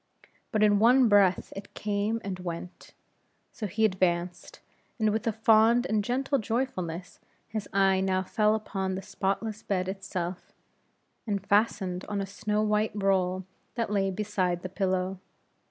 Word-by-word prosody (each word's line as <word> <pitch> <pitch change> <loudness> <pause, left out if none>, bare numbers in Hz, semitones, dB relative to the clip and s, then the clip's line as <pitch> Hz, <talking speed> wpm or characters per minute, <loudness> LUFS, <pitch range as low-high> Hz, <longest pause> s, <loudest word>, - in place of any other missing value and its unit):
But 215 -1 +2
in 205 -1 +5
one 245 +3 +6
breath 200 -3 +3
it 195 +1 -9
came 210 +2 -1
and 190 -2 -4
went. 175 0 -7 0.6
So 215 - -5
he 220 +3 +1
advanced, 180 -3 -1 0.4
and 215 -2 +2
with 220 +2 -2
a - - +3
fond 225 +2 +4
and 215 -4 +1
gentle 270 +4 0
joyfulness, 190 -7 -3 0.3
his 215 -2 -5
eye 195 -1 +3
now 190 0 +1
fell 215 +2 +2
upon 195 -3 -3
the 190 - -5
spotless 200 +3 -2
bed 185 -2 -1
itself, 185 -2 -5 0.7
and 200 -2 -2
fastened 200 -3 +1
on 205 -1 -3
a 195 - -1
snow 210 +2 -1
white 210 0 +1
roll 190 -2 +1 0.3
that 230 -3 -2
lay 195 -2 +1
beside 185 -3 -1
the 185 - -4
pillow. 185 0 -1
200 Hz, 150 wpm, -28 LUFS, 185-215 Hz, 0.7 s, one